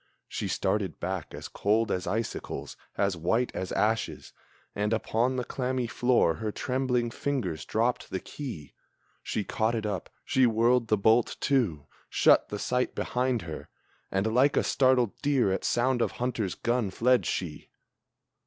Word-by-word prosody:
She - - -3
started 95 -3 -1
back 90 -3 -3
as - - -7
cold 110 +2 +1
as 90 -1 -2
icicles, 110 +5 -3 0.2
as 100 -2 +1
white 115 +9 0
as 95 - -4
ashes, 110 +1 -1 0.4
And 105 +2 0
upon 115 +3 +1
the 125 - -1
clammy 125 0 -2
floor 120 -7 +2
her 110 -1 -3
trembling 125 -1 -1
fingers 120 - -2
dropped 115 +3 0
the 95 - -2
key. 90 - -8 0.5
She 105 - -2
caught 110 +3 0
it 110 -1 -2
up, 100 -5 -3 0.2
she 130 -1 +4
whirled 115 +1 +3
the 110 - +3
bolt 110 +4 +3
to, 100 - +1 0.2
shut - - +4
the 105 - -3
sight 125 +4 -1
behind 125 -2 0
her, 80 -2 -7 0.4
And 100 +3 0
like 135 +4 +4
a - - +4
startled 130 -4 +3
deer 140 -8 +2
at 95 - -1
sound 125 +1 +1
of - - 0
hunter's 115 -6 -2
gun, 120 -3 0
fled 120 +1 +2
she! 85 -5 -4
115 Hz, 155 wpm, -28 LUFS, 100-125 Hz, 0.5 s, she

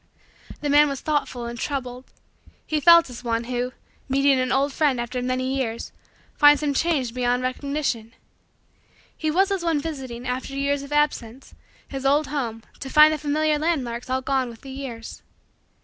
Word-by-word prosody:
The 295 - -1
man 295 +1 +6
was 275 -1 -4
thoughtful 290 -5 -2
and 235 0 -6
troubled. 255 -2 -4 0.6
He 310 - 0
felt 335 +2 +7
as 245 - -9
one, 230 -1 -1
who, 245 +1 -2 0.4
meeting 275 0 +3
an 255 0 0
old 275 +1 +1
friend 285 -5 +1
after 245 +1 -3
many 255 +1 -1
years, 235 -4 -3 0.4
finds 290 0 +6
him 290 -1 +1
changed 275 -6 0
beyond 250 0 0
recognition. 255 -3 -2 1.0
He 315 - -2
was 380 +5 +2
as 385 -3 -1
one 330 -3 +1
visiting, 265 -5 -6
after 255 +2 -3
years 280 0 0
of 280 +1 -10
absence, 275 -4 -1 0.3
his 270 -1 -6
old 285 +3 +3
home 235 -6 -3 0.2
to 270 - -6
find 305 +2 +7
the 310 - -3
familiar 300 +1 +1
landmarks 255 -7 -2
all 260 0 0
gone 265 -2 0
with 230 -1 -12
the 270 - -10
years. 260 -4 -7
270 Hz, 170 wpm, -24 LUFS, 250-295 Hz, 1.0 s, felt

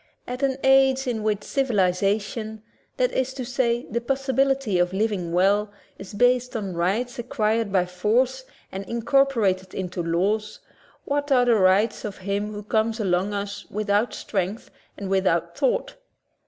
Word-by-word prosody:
At 250 +2 -5
an 270 -1 +1
age 270 0 +4
in 235 -4 -2
which 210 -1 -1
civilization 210 -1 0 0.2
— - - -41
that - - +2
is 260 0 -1
to 255 - -4
say 240 -1 0
the 235 +2 -1
possibility 270 -4 +1
of 175 +1 +1
living 195 -4 -1
well 200 +4 +2
— - - -34
is 195 +1 -9
based 245 +2 +2
on 200 -4 -3
rights 215 +9 -1
acquired 225 -2 0
by 185 -2 +2
force 240 +9 0 0.3
and 190 +1 -5
incorporated 230 -6 +1
into 180 -1 -3
laws, 200 +6 -1 0.5
what 285 0 -1
are 250 -2 +5
the 240 - +4
rights 205 +1 +3
of 205 -2 -5
him 200 +2 -3
who 210 0 -7
comes 220 +2 0
among 190 -1 +1
us 200 0 -5
without 210 +2 0
strength 195 +2 -3 0.3
and 200 - -5
without 170 -3 +1
thought? - - 0
215 Hz, 155 wpm, -24 LUFS, 195-250 Hz, 0.5 s, are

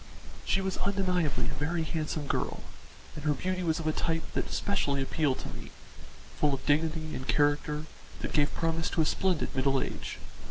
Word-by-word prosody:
She 195 - +2
was 190 -1 -1
undeniably 185 -6 +1
a - - -2
very 165 +2 0
handsome 155 -1 -2
girl, - - -1 0.5
and 150 - -7
her 150 -1 +2
beauty 185 +5 -1
was 165 -2 +1
of 165 - -4
a 155 - +3
type 165 +1 0
that - - -1
specially 145 -9 +1
appealed 135 0 +1
to - - -6
me - - -8 0.7
full 145 -2 +4
of 130 - -10
dignity 155 +1 +1
and 130 - -5
character 150 +1 +2 0.4
that - - -3
gave 145 -1 +3
promise 165 0 0
of - - -5
a 160 - +5
splendid 180 -2 +1
middle 135 0 +3
age. - - -4
155 Hz, 185 wpm, -30 LUFS, 145-170 Hz, 0.7 s, a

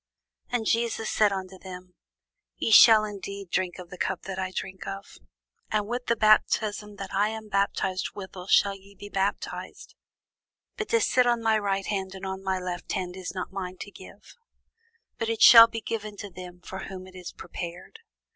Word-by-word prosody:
And 240 -2 -1
Jesus 230 -1 0
said 210 -2 +3
unto 190 -1 -5
them, 180 -1 -10 0.6
Ye - - -1
shall 220 -1 +9
indeed 200 -2 -7
drink 185 -2 -1
of 180 -2 -11
the 180 - -9
cup 190 -1 -2
that 195 -1 -5
I 185 0 -2
drink 190 0 -6
of; 195 0 -8 0.5
and 210 -1 0
with 245 +2 -4
the 235 - +3
baptism 215 -1 +2
that 195 -1 -7
I 205 +2 +2
am 220 -1 -7
baptized 195 -2 -1
withal 190 -2 -8
shall 200 0 +4
ye 195 +1 -15
be 205 +1 -10
baptized: 195 0 -3 0.8
but 430 -2 -4
to 460 - +3
sit 250 -9 +3
on 240 -1 +1
my 220 -1 +3
right 195 -1 -1
hand 190 -2 -3
and 190 - -7
on 190 0 -5
my 190 -1 0
left 180 -1 -5
hand 185 -3 -3
is 190 0 -6
not 185 - -4
mine 185 -1 -5
to 205 - -8
give; 200 +2 -14 0.8
but 225 - -1
it 225 -1 +1
shall 230 -2 +11
be 225 0 -6
given 215 -2 -5
to 205 -1 -7
them 180 0 -10
for 190 +1 -7
whom 185 -1 -8
it 185 - -14
is 180 -1 -8
prepared. 175 - -8
195 Hz, 190 wpm, -27 LUFS, 185-215 Hz, 0.8 s, shall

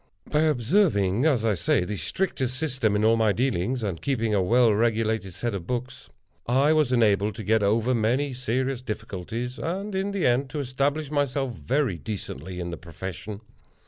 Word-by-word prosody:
By 150 - +3
observing, 125 - +2
as 125 -8 +2
I 110 - +3
say, 90 0 +1
the 105 - -3
strictest 130 - -2
system 130 -8 0
in 105 +1 +2
all 115 +1 +5
my 110 -2 +3
dealings, 120 0 0
and 95 -6 -3
keeping 115 -6 0
a 100 - +3
well 115 +4 +4
regulated 110 -3 0
set 120 +2 -2
of 90 -3 -5
books, 125 +1 -4 0.4
I 135 +5 +4
was 155 -5 +2
enabled 105 -4 +3
to 110 - -6
get 110 +2 +2
over 110 +5 +2
many 125 +5 +1
serious 130 +1 -1
difficulties, 115 +2 -5
and, 195 +5 -3
in 190 +1 -1
the 200 -3 -1
end, 125 +2 +2
to 150 - -4
establish 140 +3 -1
myself 140 -3 0
very 125 - -1
decently 95 - -6
in 85 0 -4
the 85 - -5
profession. 95 +6 -7
120 Hz, 175 wpm, -26 LUFS, 105-135 Hz, 0.4 s, all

